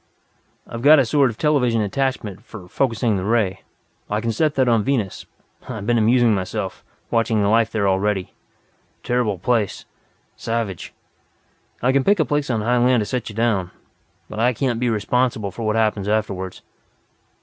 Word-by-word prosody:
I've 115 - -7
got 150 +4 +7
a 135 - +4
sort 135 +3 +3
of 110 - -8
television 125 -7 +2
attachment, 110 -2 -2
for 105 -7 -11
focusing 115 -1 0
the 90 - -3
ray. 105 -3 0 0.5
I 105 - 0
can 115 +1 -1
turn 150 +7 +1
that 130 -1 +2
on 115 -3 +3
Venus 120 -7 -2 0.4
I've 110 -5 -5
been 120 +1 +2
amusing 120 +1 +4
myself, 95 0 -4 0.3
watching 115 -2 +1
the 100 - +2
life 115 +1 +3
there, 105 -3 0
already. 95 0 0 0.7
Terrible 120 -5 0
place. 105 +2 -1 0.5
Savage. 115 -6 -4 0.9
I 125 - +4
can 135 0 +2
pick 205 +3 +3
a 155 - +3
place 145 -1 -1
on 115 -3 0
high 120 +3 +1
land 125 -1 +3
to - - -2
set 125 0 -3
you 105 - -10
down. 110 -6 0 0.6
But 105 - -7
I 120 +2 +3
can't 120 -1 -1
be 125 0 +1
responsible 115 -1 0
for 110 +4 -5
what 105 - +1
happens 110 -3 0
afterward." 100 -3 -2
115 Hz, 170 wpm, -21 LUFS, 105-125 Hz, 0.9 s, got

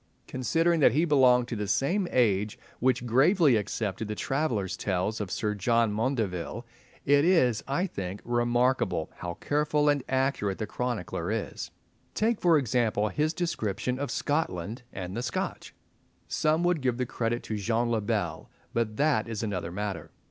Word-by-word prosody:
Considering 165 +7 +1
that 135 - +5
he 155 +5 +3
belonged 130 -5 +4
to 120 - -4
the 105 -1 -3
same 175 - +1
age 105 -4 +1 0.2
which 125 -1 +1
gravely 140 - +4
accepted 105 0 -2
the 105 - -3
travellers' 120 - -1
tales 100 +3 -1
of 100 - -4
Sir 105 +2 -1
John 115 +2 +2
Maundeville, 110 -3 -2 0.4
it 145 +1 +5
is, 140 - +3
I 140 +7 0
think, 95 - -5
remarkable 120 -6 +1
how 85 -1 -5
careful 150 +5 +1
and 145 -3 +1
accurate 130 -7 0
the 110 - -3
chronicler 120 -3 -3
is. - - -3 0.5
Take, 220 0 +1
for 170 -3 +5
example, 115 -5 +1
his 150 +7 0
description 125 - -2
of 145 - -2
Scotland 115 - -2
and 90 0 -6
the 120 - -2
Scotch. 120 -1 -3 0.6
Some 155 +2 +1
would 175 -3 +2
give 125 -2 0
the 125 - 0
credit 120 0 -2
to 110 - -3
Jean 115 +3 0
le 115 -2 +1
Bel, 105 - -2 0.2
but 110 -2 -1
that 145 -7 +2
is 115 -1 -3
another 90 -5 -3
matter. 100 +1 -4
120 Hz, 160 wpm, -28 LUFS, 105-145 Hz, 0.6 s, that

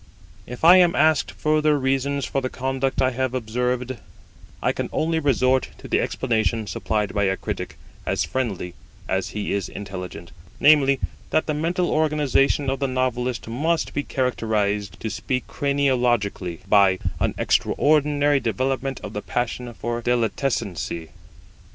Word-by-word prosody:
If 125 +4 -8
I 175 +2 +9
am 175 -2 +5
asked 155 0 +3
further 155 -1 +2
reasons 135 +1 0
for 135 - -1
the 130 - -2
conduct 135 +1 -1
I 130 - +3
have 130 0 -1
long - - +1
observed, 125 +2 -2 0.6
I - - +1
can - - -4
only 160 +1 0
resort 130 -3 +2
to - - -10
the - - +2
explanation 115 -2 0
supplied 105 +2 -2
by 100 -1 +1
a 95 0 +1
critic - - -5 0.3
as - - 0
friendly 100 -9 -3 0.3
as 95 0 -1
he 105 -1 -3
is 100 -2 -2
intelligent; 90 -4 -7 0.3
namely, 140 -3 +5 0.3
that 155 - +2
the 155 - -1
mental 170 +4 0
organisation 150 -2 +2
of 135 0 -1
the 140 - 0
novelist 125 -2 -1
must 155 +9 -1
be 145 - 0
characterised, 105 -8 -1
to 110 - -2
speak 130 -1 -2
craniologically, 120 - 0
by 100 -2 +5 0.2
an - - 0
extraordinary 145 -1 +2
development 130 +3 -1
of - - -6
the 105 - -3
passion 120 +1 -3
for 120 +1 -4
delitescency! 115 - -1
130 Hz, 145 wpm, -23 LUFS, 110-140 Hz, 0.6 s, I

